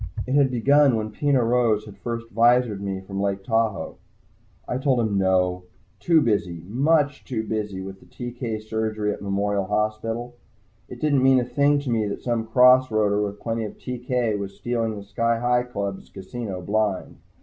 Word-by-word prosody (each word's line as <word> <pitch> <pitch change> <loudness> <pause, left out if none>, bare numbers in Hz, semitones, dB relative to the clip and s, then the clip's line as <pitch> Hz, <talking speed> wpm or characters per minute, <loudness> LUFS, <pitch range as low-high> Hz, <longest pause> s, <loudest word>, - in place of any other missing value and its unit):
It 130 - -3
had 140 -1 +4
begun 135 +2 +4
when 110 -1 -3
Peno 140 +1 +1
Rose 115 -3 +2
had 105 -2 -11
first 115 +3 -5
visored 115 -2 +3
me 95 -1 -3
from 95 +1 -5
Lake 100 -1 -1
Tahoe. 110 -2 -1 0.7
I - - -7
had 130 - -2
told 130 -3 +2
him 110 -3 0
"No." 90 -1 +1 0.3
Too 165 -2 +4
busy, 90 - -1
much 140 +5 +1
too 115 -5 -3
busy, 105 -3 -3
with 95 0 -9
TK 120 -3 -5
surgery 110 -1 -2
at - - -10
Memorial 100 0 -1
Hospital. 110 +4 -2 0.6
It 125 - -9
didn't 145 -2 +2
mean 130 0 +5
a - - 0
thing 145 +3 +2
to 135 -4 -3
me 110 -2 +1
that 100 - -5
some 115 -2 -1
cross 125 +2 +6
roader 105 -2 +1
with 105 0 -5
plenty 115 -1 -2
of 105 - -7
TK 125 -3 -2
was 100 -1 -6
stealing 115 +1 -2
the 100 - -8
Sky 115 +3 0
Hi 120 +1 +2
Club's 100 -6 -5
casino 95 -1 -6
blind. 105 0 -1
110 Hz, 180 wpm, -24 LUFS, 100-125 Hz, 0.7 s, cross